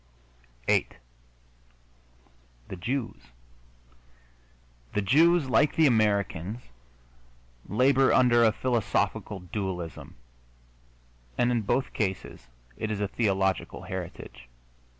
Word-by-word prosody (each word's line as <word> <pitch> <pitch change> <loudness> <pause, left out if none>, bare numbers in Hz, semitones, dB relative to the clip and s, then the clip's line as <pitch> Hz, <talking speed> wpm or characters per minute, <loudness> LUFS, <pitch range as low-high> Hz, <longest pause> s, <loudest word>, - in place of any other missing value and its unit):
VIII - - +2 1.8
THE - - -5
JEWS 95 - -4 1.7
The 105 - 0
Jews, 160 - +4
like 140 +3 +2
the 160 - +4
Americans, 105 - +1 1.1
labor 130 +4 +3
under 120 -2 +4
a 110 - +5
philosophical 105 -4 -1
dualism, 90 -3 -5 1.2
and 120 0 +2
in 120 -2 +1
both 130 +5 -1
cases 95 - -4 0.3
it 110 - -3
is 105 -2 -3
a 105 - 0
theological 95 -4 -1
heritage. - - -8
110 Hz, 90 wpm, -27 LUFS, 95-125 Hz, 1.8 s, a